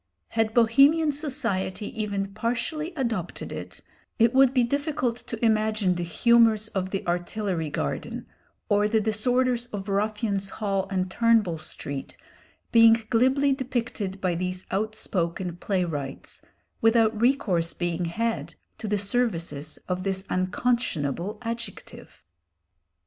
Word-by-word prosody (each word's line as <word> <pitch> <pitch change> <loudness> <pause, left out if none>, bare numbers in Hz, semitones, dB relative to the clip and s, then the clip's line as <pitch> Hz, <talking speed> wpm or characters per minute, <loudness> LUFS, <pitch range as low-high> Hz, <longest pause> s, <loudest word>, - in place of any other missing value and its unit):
Had 225 -1 0
Bohemian 275 +7 +5
society 245 -10 -2 0.2
even 200 -2 -2
partially 245 - -2
adopted 230 - -3
it, - - -7 0.4
it 230 +1 +4
would 265 -1 +6
be 255 -2 +3
difficult 285 -1 -1
to 230 -1 -4
imagine 215 -3 +2
the 175 - -3
humours 220 +4 +4
of 190 -2 -2
the 195 0 -3
Artillery 175 -1 -2
Garden, - - -3 0.4
or 205 0 +3
the 220 +1 +2
disorders 245 +3 +1
of 205 -3 -6
Ruffians' 200 0 0
Hall 195 -3 -2
and 185 -1 -1
Turnbull 220 -7 +3
Street, 140 -2 -6 0.5
being 230 -1 +7
glibly 265 +4 +3
depicted 240 -7 -3
by 185 -2 0
these 185 +1 -3
outspoken 190 -4 -2
playwrights 165 -8 -3 0.4
without 225 -1 +3
recourse 200 -10 +2
being 175 0 -2
had 230 +7 -2 0.2
to 220 - -5
the 210 0 +1
services 180 -9 -1
of 180 0 -2
this 190 0 -2
unconscionable 185 - -1
adjective. 230 0 -7
215 Hz, 120 wpm, -26 LUFS, 185-235 Hz, 0.5 s, being